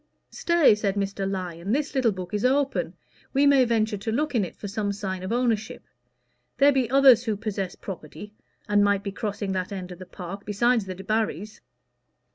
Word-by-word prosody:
"Stay," 340 -8 +4
said 210 -2 -1
Mr. 195 -1 -2
Lyon, 185 0 -3
"this 290 +2 -1
little 255 -5 +2
book 185 0 -7
is 210 - -1
open; 270 +1 +1 0.4
we 280 +1 +3
may 275 -2 +5
venture 220 -2 0
to 210 +3 -4
look 295 +6 -1
in 230 -5 +2
it 180 - -6
for 205 - -7
some 205 0 -2
sign 190 -2 -4
of 185 - -5
ownership. 230 -3 -1 0.7
There 285 +1 +6
be 260 -4 0
others 270 -2 +6
who 215 -2 -1
possess 200 -4 -4
property, 195 +3 -9 0.3
and 205 -1 +3
might 200 -1 +2
be 200 - -4
crossing 205 -1 -4
that 185 +1 -3
end 185 -2 -6
of 180 - -10
the 185 - -10
park, 190 +2 -8
besides 225 +2 +1
the 185 -1 -6
Debarrys." 210 0 -2
210 Hz, 190 wpm, -25 LUFS, 195-240 Hz, 0.7 s, There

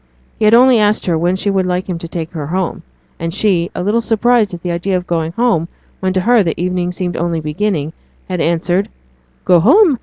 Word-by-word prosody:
He 215 - +2
had 215 +2 +6
only 250 -1 +6
asked 210 0 +1
her 175 - +1
when 175 +3 +1
she 200 +2 -1
would 190 -2 0
like 180 +1 -2
him 180 -3 -4
to 170 - -7
take 165 -1 -5
her 150 -4 -5
home; 185 +2 -2 0.4
and 165 0 -3
she, 175 -2 +1
a - - -3
little 215 +4 +1
surprised 230 -1 +2
at 175 -2 -8
the 175 - -2
idea 185 +2 -1
of 180 - -6
going 165 -2 -2
home 225 -7 +1 0.3
when 190 0 -1
to 185 - +1
her 235 +3 +4
the 165 -4 -2
evening 180 0 -1
seemed 180 -1 -4
only 170 -1 -1
beginning, 155 0 -2 0.3
had 180 -3 -2
answered 175 +3 0 0.6
'Go 180 -1 +5
home? 290 - +4
180 Hz, 220 wpm, -16 LUFS, 170-210 Hz, 0.6 s, had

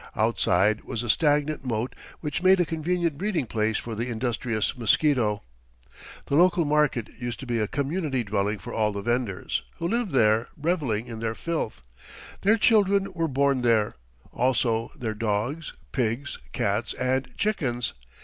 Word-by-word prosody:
Outside 105 +5 +2
was 115 - -3
a 120 - +4
stagnant 150 0 +1
moat 120 -1 -2 0.3
which 150 0 -2
made 185 +1 +5
a 175 - +3
convenient 165 -1 -1
breeding 195 -8 0
place 110 -1 0
for 115 - -5
the 115 +3 -2
industrious 115 -1 -1
mosquito. 120 -2 +2 0.8
The - - -5
local 175 0 +4
market 150 -6 +2
used 120 -1 -4
to - - -6
be 120 -2 -1
a 105 - +1
community 140 - -1
dwelling 105 0 0
for - - -8
all 105 -1 +1
the 100 -1 -5
vendors, 120 -4 -1 0.2
who 170 - -2
lived 235 +1 0
there, 115 -5 +3
reveling 145 -9 0
in 115 -2 -7
their 115 0 -2
filth. 135 - -3 0.6
Their 215 +3 +4
children 200 -3 +3
were 165 -2 0
born 140 -2 +2
there, 115 -3 +3 0.4
also 115 -2 +1
their 110 -3 -3
dogs, 115 +8 -2 0.2
pigs, 125 +2 -1
cats, 100 +3 -1
and 130 +1 0
chickens. 125 - -1
125 Hz, 155 wpm, -26 LUFS, 110-155 Hz, 0.8 s, made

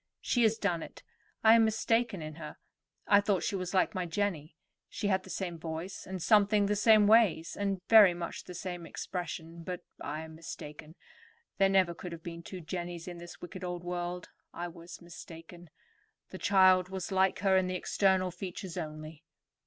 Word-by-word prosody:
"She 245 - 0
has 220 -1 +3
done 180 -6 0
it; - - -10 0.4
I 220 0 +8
am 230 0 +6
mistaken 225 -3 +1
in 155 0 -6
her. 150 - -8 0.5
I 205 0 +5
thought 200 -3 0
she - - -1
was 185 0 -3
like 185 - +3
my 185 -3 -2
Jenny. 165 -4 -2 0.3
She 205 - -2
had 190 -1 +2
the 190 - -14
same 175 -3 -4
voice, 165 +3 -6
and 190 0 -5
something 210 -1 +4
the 205 +1 +1
same 215 0 +6
ways, 205 -7 +4
and 195 -2 -2
very 210 -6 +8
much 170 -1 -6
the 180 - -9
same 175 -3 -6
expression; 170 -2 -6
but 180 +1 -5 0.2
I 150 +2 -4
am 160 0 -9
mistaken. 155 -1 -9 0.6
There 195 0 +5
never 190 -3 +3
could 175 +1 -8
have 165 -1 -10
been 170 -1 -7
two 180 +2 -8
Jennies 175 0 -5
in 175 -1 -7
this 175 0 -11
wicked 185 +1 -8
old 175 -1 -4
world. 175 0 -4 0.3
I 175 0 -4
was 170 0 -12
mistaken. 170 0 -12 0.6
The - - -8
child 185 -2 +5
was 190 0 -5
like 190 0 +2
her 195 -1 +3
in 185 -1 +3
the 185 - -2
external 185 0 +1
features 180 0 -7
only." 155 -1 -7
180 Hz, 185 wpm, -31 LUFS, 170-195 Hz, 0.6 s, I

